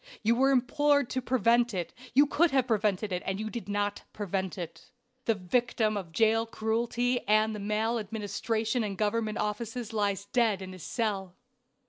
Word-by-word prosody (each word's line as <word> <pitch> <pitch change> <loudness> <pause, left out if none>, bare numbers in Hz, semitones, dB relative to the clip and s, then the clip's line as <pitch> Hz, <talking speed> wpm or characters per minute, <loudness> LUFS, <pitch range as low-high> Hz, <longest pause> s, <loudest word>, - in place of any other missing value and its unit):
You 225 +2 +4
were 265 +3 +4
implored 280 +1 +2
to 260 - -1
prevent 240 -2 +2
it, 175 -2 -3 0.2
you 285 +2 +7
could 320 +4 +3
have 265 -3 +2
prevented 210 -3 0
it, 180 0 -1
and 195 +1 -2
you 215 0 -4
did 230 -5 -6
not 205 0 -1
prevent 190 -2 -3
it. 175 +6 -8 0.4
The 225 - +2
victim 215 +3 0
of 185 -5 -5
jail 225 +4 +3
cruelty 235 +3 0
and 215 +1 +3
of 210 - -6
the 200 - -5
maladministration 220 +1 -1
in 200 -2 -3
government 215 +1 0
offices 225 +2 -3
lies 200 -2 0
dead 215 -3 +1
in 185 0 -8
his 185 - -11
cell. 195 -5 -2
220 Hz, 170 wpm, -29 LUFS, 205-235 Hz, 0.4 s, you